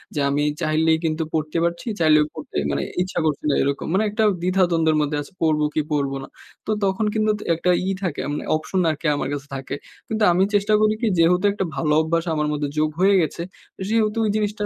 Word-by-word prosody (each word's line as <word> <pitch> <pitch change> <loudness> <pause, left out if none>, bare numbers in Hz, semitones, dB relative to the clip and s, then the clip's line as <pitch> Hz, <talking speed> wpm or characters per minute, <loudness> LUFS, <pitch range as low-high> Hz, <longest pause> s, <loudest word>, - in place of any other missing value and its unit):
যে 150 - -1
আমি 145 +1 +1 0.2
চাইলেই 160 0 +2
কিন্তু 160 0 0
পড়তে 155 +1 -1
পারছি। 170 +8 -2
চাইলেও 155 -2 +5
পড়তে 155 - -7
মানে 70 - -1 0.2
ইচ্ছা 185 -1 -2
করছে 150 -2 -1
না 140 - +2
এরকম। 140 0 -2
মানে 195 +3 +3
একটা 215 +2 0 0.2
দ্বিধাদ্বন্দ্বের 175 -3 +2
মধ্যে 150 0 -1
আছি 145 - -11
পড়বো 155 -2 +2
কি, 155 - +1
পড়বো 140 -2 0
না। - - -9 0.4
তো 215 - -2
তখন 195 +2 +1
কিন্তু 215 -1 +2
ত - - -10
একটা 180 +2 -1 0.2
ই - - +1
থাকে 170 -5 -2
মানে - - -3
অপশন 155 +4 -2
আরকি 155 +1 -4
আমার 145 - -2
কাছে 145 0 -5
থাকে। 135 0 -5 0.3
কিন্তু 220 0 -1
আমি 180 +2 +3
চেষ্টা 205 +1 +2
করি 215 0 +4
কি 235 - +1
যেহেতু 180 +3 +3
একটা 190 - -2
ভালো 150 +2 +1
অভ্যাস 165 +1 0
আমার 150 -1 0
মধ্যে 145 -1 -2
যোগ 155 0 +2
হয়ে 200 +1 +5
গেছে, 160 +1 -2 0.5
সেহেতু 220 0 +1
এই - - +1
জিনিসটা 210 0 -1
160 Hz, 215 wpm, -22 LUFS, 150-195 Hz, 0.5 s, চাইলেও